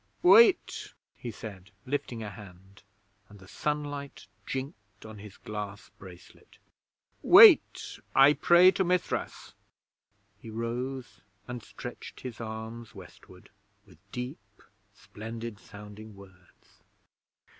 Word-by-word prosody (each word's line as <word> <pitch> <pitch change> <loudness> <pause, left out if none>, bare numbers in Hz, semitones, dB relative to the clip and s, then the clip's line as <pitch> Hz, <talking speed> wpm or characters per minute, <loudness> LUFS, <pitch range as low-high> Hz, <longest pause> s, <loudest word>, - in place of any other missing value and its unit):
'Wait!' 225 - +5 0.2
he 120 - -8
said, 100 -4 -10 0.2
lifting 125 -4 -4
a 105 - -5
hand, 95 -1 -14 0.5
and 105 - -15
the 95 -1 -16
sunlight 145 +2 -4 0.2
jinked 105 -8 -7
on 110 -1 -10
his 100 -1 -12
glass 105 -1 -7
bracelet. 90 -2 -15 0.6
'Wait! - - +7 0.2
I 135 +2 +7
pray 175 +4 +6
to 190 - 0
Mithras!' 180 0 -2 0.9
He 115 - -11
rose 120 +3 -5 0.3
and 125 -1 -6
stretched 120 +2 -10
his 125 -2 -8
arms 110 +1 -8
westward, - - -15 0.3
with 90 -6 -20
deep, 125 +4 -8 0.3
splendid 115 0 -9
sounding 105 +1 -12
words. 95 -2 -20
115 Hz, 105 wpm, -28 LUFS, 100-130 Hz, 0.9 s, Wait